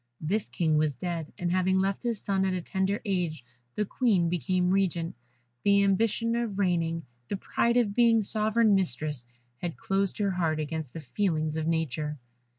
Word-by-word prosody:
This 200 Hz, +7 st, -1 dB
King 155 Hz, -3 st, +1 dB
was 155 Hz, -3 st, +1 dB
dead, 165 Hz, +2 st, -4 dB
and 175 Hz, -1 st, -1 dB
having 185 Hz, +1 st, +2 dB
left 195 Hz, +1 st, 0 dB
his 235 Hz, -4 st, -1 dB
son 195 Hz, -2 st, 0 dB
at 190 Hz, -1 st, +1 dB
a 180 Hz, -, -2 dB
tender 190 Hz, +2 st, 0 dB
age, 175 Hz, -, -1 dB, 0.3 s
the 210 Hz, -, 0 dB
Queen 200 Hz, -7 st, +2 dB
became 180 Hz, +2 st, +1 dB
regent. 180 Hz, -4 st, 0 dB, 0.5 s
The 200 Hz, 0 st, +5 dB
ambition 225 Hz, +3 st, +2 dB
of 235 Hz, -4 st, -2 dB
reigning, 165 Hz, -4 st, 0 dB, 0.2 s
the 200 Hz, -, -2 dB
pride 235 Hz, +4 st, +1 dB
of 220 Hz, -5 st, +2 dB
being 230 Hz, -1 st, +4 dB
Sovereign 215 Hz, +1 st, +2 dB
Mistress, 150 Hz, -7 st, 0 dB, 0.3 s
had 170 Hz, +1 st, -4 dB
closed 195 Hz, 0 st, 0 dB
her 200 Hz, -2 st, +1 dB
heart 165 Hz, -4 st, 0 dB
against 155 Hz, -3 st, -4 dB
the 165 Hz, -, -6 dB
feelings 155 Hz, -4 st, -1 dB
of 160 Hz, 0 st, -2 dB
nature. 155 Hz, -2 st, -1 dB
185 Hz, 170 wpm, -28 LUFS, 160-200 Hz, 0.5 s, The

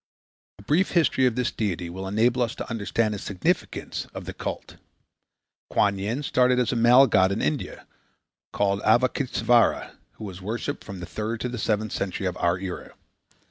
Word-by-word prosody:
A 100 Hz, -, -14 dB
brief 160 Hz, -, +1 dB
history 145 Hz, -6 st, +3 dB
of 120 Hz, -, -1 dB
this 125 Hz, -1 st, 0 dB
deity 90 Hz, -5 st, -2 dB
will 95 Hz, +3 st, -6 dB
enable 120 Hz, +5 st, +2 dB
us 115 Hz, -1 st, 0 dB
to -, -, -6 dB
understand 110 Hz, 0 st, 0 dB
the 105 Hz, -, -4 dB
significance 95 Hz, -2 st, -2 dB
of -, -, -6 dB
the -, -, -6 dB
cult. -, -, -6 dB, 0.9 s
Kuan 100 Hz, -1 st, +2 dB
Yin 115 Hz, +9 st, -2 dB
started 125 Hz, -2 st, +3 dB
as 125 Hz, -3 st, +1 dB
a -, -, -1 dB
male 120 Hz, +3 st, +7 dB
god 95 Hz, -6 st, +3 dB
in 100 Hz, -, -1 dB
India, 150 Hz, -4 st, -3 dB, 0.7 s
called 100 Hz, 0 st, 0 dB
Avalôkitêsvara, 120 Hz, 0 st, +2 dB, 0.2 s
who -, -, -11 dB
was 95 Hz, -3 st, -7 dB
worshipped 115 Hz, +8 st, -4 dB
from 100 Hz, -4 st, -8 dB
the -, -, -5 dB
third 110 Hz, +6 st, -4 dB
to 125 Hz, -, -2 dB
the 120 Hz, -1 st, -5 dB
seventh 110 Hz, -1 st, 0 dB
century 95 Hz, 0 st, -3 dB
of 90 Hz, -1 st, -1 dB
our 85 Hz, +1 st, +1 dB
era. 95 Hz, -1 st, -7 dB
110 Hz, 180 wpm, -25 LUFS, 100-125 Hz, 0.9 s, male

